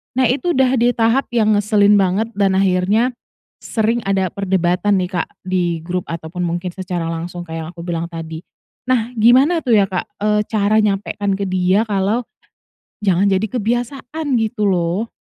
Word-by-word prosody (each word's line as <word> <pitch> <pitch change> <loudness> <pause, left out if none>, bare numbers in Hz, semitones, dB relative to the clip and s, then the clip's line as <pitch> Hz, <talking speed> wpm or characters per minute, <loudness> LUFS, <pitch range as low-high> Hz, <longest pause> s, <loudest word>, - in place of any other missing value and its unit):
Nah, 260 - +2
itu 345 +6 -1
udah 260 0 +3
di 240 +1 +4
tahap 230 +4 +2
yang 215 -2 +3
ngeselin 205 0 +4
banget 195 +5 0
dan 195 -1 +3
akhirnya 195 +6 +2 0.5
sering 230 +1 0
ada 190 -2 +1
perdebatan 190 +1 +1
nih, 180 0 -2
Kak, 175 -3 -1 0.2
di 175 -3 -1
grup 180 +1 -3
ataupun 170 +2 -5
mungkin 175 +1 -3
secara 180 -3 -4
langsung 175 +1 -5
kayak 165 0 -6
yang - - -8
aku 170 - -8
bilang 170 -1 -3
tadi. 165 -1 -7 0.5
Nah, 240 -2 +1
gimana 260 +10 +5
tuh 245 -6 +2
ya, 200 - +4
Kak, 180 - -2
eee, 210 0 +2
cara 215 0 +2
nyampekkan 200 -1 -1
ke 200 - -3
dia 185 +3 +2
kalau 205 +4 0 0.8
jangan 190 +1 +3
jadi 195 +3 +1
kebiasaan? 245 +6 -3
Gitu 220 -1 -2
loh. 185 +4 0
200 Hz, 165 wpm, -18 LUFS, 180-225 Hz, 0.8 s, gimana